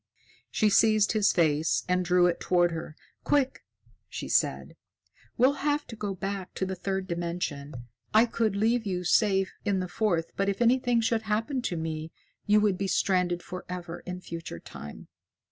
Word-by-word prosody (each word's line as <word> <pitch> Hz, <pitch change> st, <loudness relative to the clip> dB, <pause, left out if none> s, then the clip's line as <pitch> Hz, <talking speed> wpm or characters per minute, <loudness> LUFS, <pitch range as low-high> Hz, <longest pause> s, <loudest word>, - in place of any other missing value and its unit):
She 215 Hz, -1 st, +2 dB
seized 215 Hz, 0 st, +4 dB
his 215 Hz, -2 st, +3 dB
face 160 Hz, -2 st, +2 dB
and 180 Hz, 0 st, +1 dB
drew 180 Hz, 0 st, +4 dB
it 175 Hz, -1 st, +1 dB
toward 175 Hz, -1 st, +2 dB
her. 160 Hz, -2 st, -6 dB, 0.3 s
"Quick!" 280 Hz, -3 st, +1 dB, 0.5 s
she -, -, -6 dB
said. -, -, 0 dB, 0.6 s
"We'll 260 Hz, +3 st, +5 dB
have 295 Hz, 0 st, 0 dB
to 230 Hz, -, -9 dB
go 205 Hz, -3 st, -4 dB
back 195 Hz, 0 st, -5 dB
to 190 Hz, -, -1 dB
the 190 Hz, -, -3 dB
third 190 Hz, +1 st, -3 dB
dimension. 170 Hz, -5 st, -4 dB, 0.4 s
I 220 Hz, +2 st, +6 dB
could 225 Hz, -3 st, 0 dB
leave 225 Hz, +3 st, +2 dB
you 180 Hz, -2 st, -2 dB
safe 195 Hz, +1 st, +2 dB
in 200 Hz, -2 st, +1 dB
the 185 Hz, -, -2 dB
fourth, 175 Hz, -3 st, 0 dB
but 195 Hz, 0 st, 0 dB
if 195 Hz, -, -2 dB
anything 245 Hz, 0 st, +3 dB
should 225 Hz, 0 st, +1 dB
happen 225 Hz, +5 st, -1 dB
to 180 Hz, -8 st, -2 dB
me, 160 Hz, 0 st, -4 dB, 0.4 s
you 210 Hz, +1 st, +5 dB
would 200 Hz, -3 st, +1 dB
be 195 Hz, -, -1 dB
stranded 180 Hz, -2 st, +1 dB
forever 180 Hz, -1 st, -7 dB
in 180 Hz, 0 st, -5 dB
future 165 Hz, -, -7 dB
time." 75 Hz, -2 st, -10 dB
190 Hz, 170 wpm, -28 LUFS, 175-220 Hz, 0.6 s, I